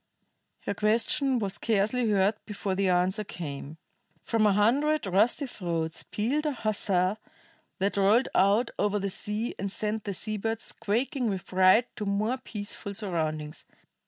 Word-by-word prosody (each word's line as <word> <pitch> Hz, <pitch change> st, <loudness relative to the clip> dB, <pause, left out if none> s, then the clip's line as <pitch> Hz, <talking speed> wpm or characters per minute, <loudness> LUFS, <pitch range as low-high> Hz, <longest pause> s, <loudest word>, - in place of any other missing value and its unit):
Her -, -, -2 dB
question 230 Hz, +6 st, +2 dB
was 200 Hz, -4 st, -1 dB
scarcely 225 Hz, +2 st, +1 dB
heard 200 Hz, 0 st, +3 dB
before 205 Hz, -2 st, -2 dB
the 195 Hz, 0 st, +1 dB
answer 185 Hz, +4 st, +2 dB
came. 155 Hz, -5 st, -7 dB, 0.5 s
From 225 Hz, -2 st, +2 dB
a 205 Hz, -, +4 dB
hundred 275 Hz, +9 st, +2 dB
rusty 210 Hz, +9 st, +2 dB
throats 170 Hz, -, -3 dB
pealed 275 Hz, +9 st, -1 dB
a 295 Hz, -, 0 dB
huzzah 205 Hz, -4 st, 0 dB, 0.6 s
that 200 Hz, +2 st, 0 dB
rolled 205 Hz, +6 st, +4 dB
out 205 Hz, +5 st, +3 dB
over 210 Hz, 0 st, +2 dB
the 200 Hz, -1 st, -2 dB
sea 210 Hz, +5 st, -3 dB
and 195 Hz, 0 st, -2 dB
sent 215 Hz, 0 st, -2 dB
the 200 Hz, -2 st, -2 dB
sea 215 Hz, +3 st, -3 dB
birds 225 Hz, +2 st, -2 dB
squawking 240 Hz, +4 st, -1 dB
with 190 Hz, -3 st, -3 dB
fright 190 Hz, +6 st, +4 dB
to 210 Hz, -, -3 dB
more 215 Hz, +6 st, 0 dB
peaceful 205 Hz, -4 st, -7 dB
surroundings. 155 Hz, -6 st, -3 dB
210 Hz, 150 wpm, -28 LUFS, 190-225 Hz, 0.6 s, a